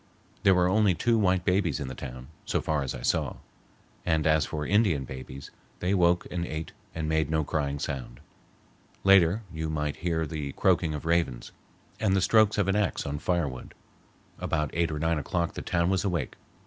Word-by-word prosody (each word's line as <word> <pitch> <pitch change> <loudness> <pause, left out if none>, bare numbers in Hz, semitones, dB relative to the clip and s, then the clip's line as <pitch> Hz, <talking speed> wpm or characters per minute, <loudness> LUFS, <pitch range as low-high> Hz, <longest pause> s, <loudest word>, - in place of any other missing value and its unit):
There 95 - +5
were 90 0 +3
only 100 -1 +3
two 115 +5 +2
white 95 -3 +2
babies 95 -2 +1
in 70 - -4
the 65 - -5
town, 65 0 -8
so - - 0
far 75 -2 -1
as 65 - -3
I - - -8
saw, - - 0 0.7
and 80 -2 +1
as 80 -1 +3
for 75 -1 -3
Indian 100 -8 +2
babies, 65 +1 -9 0.3
they 90 +2 0
woke 90 -2 +3
and 90 -1 -2
ate 80 -1 -5 0.2
and 80 -1 -2
made 80 -1 +1
no 80 -1 +1
crying 70 -1 -1
sound. 65 -4 -5 0.8
Later 95 +2 +5
you 80 0 -3
might 75 -1 -2
hear 85 -2 -1
the 75 -3 -5
croaking 75 -2 +2
of 75 - -7
ravens, 80 -8 0 0.5
and 95 - +2
the 95 - +2
strokes 110 +1 +4
of 100 -2 +2
an 95 - +2
axe 105 -4 0
on 70 +1 -3
firewood. 80 -8 -2 0.6
About 75 -3 -1
eight 85 0 +1
or 75 - -3
nine 80 +1 +1
o'clock 85 +3 -2
the - - -5
town 85 +1 +1
was 95 -1 +1
awake. 85 -9 -1
80 Hz, 190 wpm, -28 LUFS, 75-90 Hz, 0.8 s, There